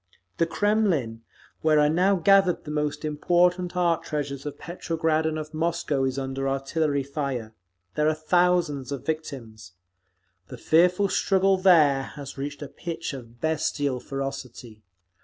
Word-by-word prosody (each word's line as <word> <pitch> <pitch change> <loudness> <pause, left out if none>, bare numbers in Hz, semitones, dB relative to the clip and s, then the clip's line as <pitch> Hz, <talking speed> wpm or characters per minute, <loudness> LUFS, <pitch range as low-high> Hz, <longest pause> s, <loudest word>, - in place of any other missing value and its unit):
The 165 - +2
Kremlin, 175 - 0 0.4
where 155 -1 +4
are 150 - +5
now 180 +6 +3
gathered 195 0 +3
the 150 - -7
most 150 0 -2
important 175 +4 +1
art 170 -2 +2
treasures 145 -2 -4
of 145 - -6
Petrograd 160 -2 -1
and 155 0 -2
of 155 0 -6
Moscow, 155 -4 0
is 130 0 -2
under 135 0 -2
artillery 140 +1 -1
fire. 135 -6 -4 0.4
There 150 - +1
are 155 - 0
thousands 155 -4 +1
of 140 -4 -5
victims. 120 - -6 0.7
The - - -9
fearful 180 +4 +3
struggle 195 0 +2
there 160 -8 +5
has 140 -2 -8
reached 145 +1 -5
a - - -6
pitch 165 +2 -6
of 120 -3 -10
bestial 145 -4 -1
ferocity. 130 -5 -6
150 Hz, 140 wpm, -25 LUFS, 135-170 Hz, 0.7 s, are